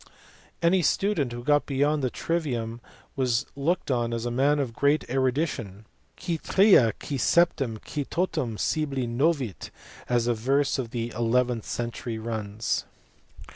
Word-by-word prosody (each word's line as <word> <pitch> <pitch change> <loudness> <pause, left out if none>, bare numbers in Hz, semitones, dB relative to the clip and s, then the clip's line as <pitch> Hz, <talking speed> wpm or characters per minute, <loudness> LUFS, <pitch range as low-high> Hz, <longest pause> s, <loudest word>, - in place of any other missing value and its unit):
Any 180 +2 +4
student 170 -6 +1
who 120 0 -6
got 145 +2 +2
beyond 145 +2 +1
the 130 - 0
trivium 120 -8 -2 0.3
was 125 -3 +1
looked 145 +2 0
on 120 -2 0
as 115 0 -4
a 120 - -1
man 140 +4 +3
of 135 -5 -2
great 140 +5 +1
erudition, 130 - -1 0.3
Qui 170 -3 -2
tria, 190 - +5
qui 140 +3 -5
septein. 135 -7 +2
qui 150 - -3
totum 155 - -2
scibile 140 -3 -1
novit, 130 - 0 0.4
as 120 -1 +2
a 120 - +2
verse 135 +5 +1
of 120 -3 -3
the 120 0 -3
eleventh 120 0 +1
century 120 -1 -4
runs. 110 -1 -3
130 Hz, 140 wpm, -26 LUFS, 115-150 Hz, 0.4 s, tria